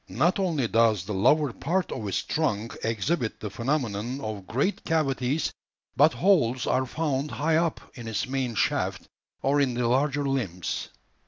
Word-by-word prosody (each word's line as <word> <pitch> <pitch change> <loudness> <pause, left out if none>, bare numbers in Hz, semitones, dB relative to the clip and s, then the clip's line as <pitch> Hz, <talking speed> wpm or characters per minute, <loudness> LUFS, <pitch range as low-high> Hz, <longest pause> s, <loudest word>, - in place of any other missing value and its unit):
Not 170 - +2
only 160 -10 +1
does 110 -5 +3
the 105 - -4
lower 135 +7 +3
part 175 +9 -1
of 105 - -4
its 95 - -1
trunk 115 -8 -1
exhibit 115 - -1
the 105 - -5
phenomenon 120 0 -2
of 105 -7 -5
great 140 - 0
cavities, 140 -3 0 0.4
but 150 +3 +5
holes 145 -10 +3
are 130 0 +1
found 145 0 -1
high 155 +2 +1
up 165 -1 +1
in 120 -2 -9
its 105 -4 -1
main 130 -3 -2
shaft - - 0 0.4
or 145 +1 +3
in 130 -3 +1
the 120 -1 +1
larger 140 +3 +1
limbs. 100 -11 -2
130 Hz, 160 wpm, -27 LUFS, 115-150 Hz, 0.4 s, but